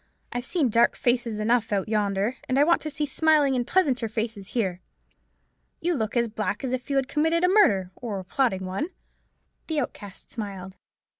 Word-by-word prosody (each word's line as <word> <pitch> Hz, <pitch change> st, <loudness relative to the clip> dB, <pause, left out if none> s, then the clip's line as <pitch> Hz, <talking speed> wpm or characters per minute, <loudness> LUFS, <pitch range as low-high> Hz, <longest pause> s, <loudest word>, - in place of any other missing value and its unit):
I've 245 Hz, +1 st, -2 dB
seen 300 Hz, -4 st, +1 dB
dark 230 Hz, +2 st, +4 dB
faces 240 Hz, -3 st, 0 dB
enough 230 Hz, +1 st, +1 dB
out 195 Hz, -2 st, 0 dB
yonder; 210 Hz, +1 st, 0 dB
and 260 Hz, -, +2 dB
I 285 Hz, -, +6 dB
want 340 Hz, +3 st, +3 dB
to 310 Hz, -, -3 dB
see 300 Hz, 0 st, -2 dB
smiling 295 Hz, -1 st, +3 dB
and 245 Hz, -1 st, -1 dB
pleasanter 260 Hz, -11 st, +2 dB
faces 220 Hz, -3 st, -3 dB
here. 185 Hz, -5 st, -1 dB, 1.0 s
You 345 Hz, +1 st, 0 dB
look 225 Hz, -4 st, -2 dB
as 235 Hz, 0 st, +3 dB
black 210 Hz, -1 st, -3 dB
as 255 Hz, -1 st, -2 dB
if 255 Hz, +1 st, -4 dB
you 280 Hz, -, 0 dB
had 270 Hz, -1 st, +2 dB
committed 320 Hz, +4 st, +1 dB
a -, -, +6 dB
murder, 210 Hz, -, +4 dB
or 230 Hz, -4 st, -5 dB
were 190 Hz, -, -5 dB
plotting 190 Hz, -3 st, 0 dB
one." 195 Hz, -, -3 dB, 0.8 s
The 315 Hz, -2 st, 0 dB
Outcast 205 Hz, -7 st, -6 dB
smiled. 195 Hz, -4 st, -6 dB
240 Hz, 190 wpm, -26 LUFS, 205-285 Hz, 1.0 s, I